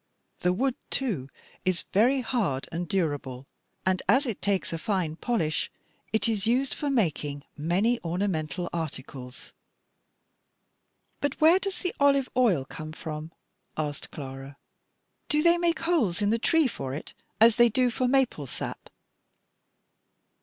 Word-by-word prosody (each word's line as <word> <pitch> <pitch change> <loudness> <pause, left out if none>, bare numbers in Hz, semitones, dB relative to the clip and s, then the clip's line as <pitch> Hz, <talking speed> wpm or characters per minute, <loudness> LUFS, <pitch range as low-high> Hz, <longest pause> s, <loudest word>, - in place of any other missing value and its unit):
The 180 - +2
wood, 255 +8 +1 0.2
too, 190 - -1 0.3
is 185 -2 0
very 250 +7 +4
hard 205 - -1
and 170 +2 -3
durable, 145 -8 -2 0.4
and, 185 -1 +2
as 275 +3 +5
it 230 -6 -4
takes 195 -4 0
a 165 - -3
fine 185 -6 -1
polish, 165 -6 0 0.4
it 220 +1 +2
is 220 -2 0
used 255 +3 +2
for 290 - -2
making 150 - 0
many 190 +10 +1
ornamental 175 -2 -1
articles." 135 -5 -6 1.7
"And 285 -1 0
where 330 +4 +6
does 395 -1 -3
the 360 - -1
olive 280 -2 +4
oil 205 - +3
come 155 +1 -8
from?" 155 0 -6 0.5
asked 150 -2 -3
Clara. 135 0 -8 0.7
"Do 300 0 +3
they 340 0 +5
make 335 -2 +1
holes 290 - +2
in 205 0 +2
the 230 - +2
tree 320 +4 +3
for 135 - -5
it, 150 - -8 0.3
as 225 +1 +6
they 240 -1 +7
do 250 +2 +2
for 255 +2 0
maple 250 - +2
sap?" - - -5
195 Hz, 140 wpm, -27 LUFS, 155-255 Hz, 1.7 s, they